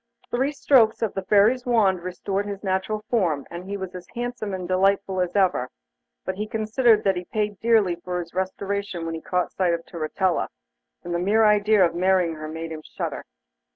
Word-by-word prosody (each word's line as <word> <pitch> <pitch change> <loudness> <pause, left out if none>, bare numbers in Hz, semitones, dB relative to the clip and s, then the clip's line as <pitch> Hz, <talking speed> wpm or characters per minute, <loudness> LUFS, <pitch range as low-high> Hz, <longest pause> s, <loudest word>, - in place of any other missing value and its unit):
Three 265 +4 +1
strokes 240 -6 +3
of 220 - -1
the 195 - -2
Fairy's 210 +6 +3
wand 200 -7 +3
restored 195 +3 -3
his 200 0 -6
natural 190 +2 -1
form, 170 - +1
and 170 +1 -7
he 200 - -3
was 190 -2 -6
as 180 -1 -9
handsome 240 -3 -3
and 185 -2 -4
delightful 190 0 +2
as 180 +1 -2
ever, 185 -10 +2 0.6
but 190 - -1
he 210 +1 -3
considered 220 +1 +2
that 195 -1 +2
he 180 0 -4
paid 210 -1 -2
dearly 220 -6 +3
for 180 +1 -4
his 170 -1 -7
restoration 190 -1 -3
when 165 - -3
he 160 - -5
caught 180 -1 -1
sight 180 -3 +1
of 165 - -8
Turritella, 170 +2 -1 0.6
and 175 - -4
the 170 - 0
mere 215 +5 +3
idea 210 -1 +5
of 170 - -1
marrying 180 -1 +2
her 155 -1 -7
made 160 +1 -6
him 155 -1 -6
shudder. - - -5
190 Hz, 195 wpm, -24 LUFS, 175-210 Hz, 0.6 s, idea